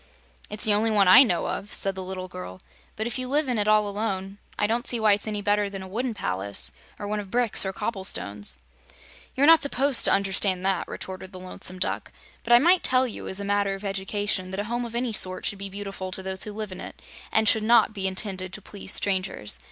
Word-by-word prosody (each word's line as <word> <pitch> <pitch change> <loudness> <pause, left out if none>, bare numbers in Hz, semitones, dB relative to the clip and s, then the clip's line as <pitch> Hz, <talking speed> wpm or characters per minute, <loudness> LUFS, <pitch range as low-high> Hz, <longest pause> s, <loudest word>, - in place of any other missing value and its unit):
"It's 210 - -5
the 215 - +4
only 215 +2 +2
one 205 -3 +3
I 185 +8 +9
know 180 -11 +2
of," 205 - -4
said 195 - -1
the 190 - -6
little 185 0 -6
girl; 90 - -9 0.3
"but 220 - -3
if 240 +3 -3
you 255 - -3
live 290 +2 0
in 245 -4 0
it 205 - 0
all 215 -1 +4
alone, 200 -1 -4 0.2
I 210 - +2
don't 230 +3 -1
see 240 - -1
why 215 -2 +5
it's 205 +2 0
any 210 -1 -3
better 205 0 +1
than 195 -1 -7
a - - -9
wooden 230 +4 -3
palace, 95 - +5 0.3
or 205 - -6
one 210 +1 -2
of 200 -2 -7
bricks 235 -3 +1
or - - -2
cobble 205 0 -4
stones." 100 - -3 0.8
"You're 275 - +3
not 325 +1 +7
supposed 280 -1 +2
to - - +5
understand 190 -1 +1
that," 190 -2 +1
retorted 190 0 -8
the 185 - -10
Lonesome 185 0 -5
Duck. 185 - -3 0.3
"But 235 - -4
I - - +10
might 345 +8 +4
tell 255 0 +2
you, 240 - -6
as 190 - -2
a 200 - -5
matter 200 -1 0
of 195 +2 -10
education, 195 -1 -1
that 190 +1 -5
a - - -1
home 240 +3 -3
of 235 0 -8
any 240 -1 -1
sort 185 -2 0
should 200 - -2
be 200 0 -4
beautiful 195 -1 -6
to 190 - -2
those 190 0 -3
who 210 - -6
live 210 -1 -6
in 185 - -8
it, - - -9 0.3
and 220 0 +2
should 220 - +5
not 220 0 +4
be 195 -2 -2
intended 185 -1 -2
to - - -1
please 200 -2 -5
strangers. 185 - -1
205 Hz, 245 wpm, -25 LUFS, 190-220 Hz, 0.8 s, I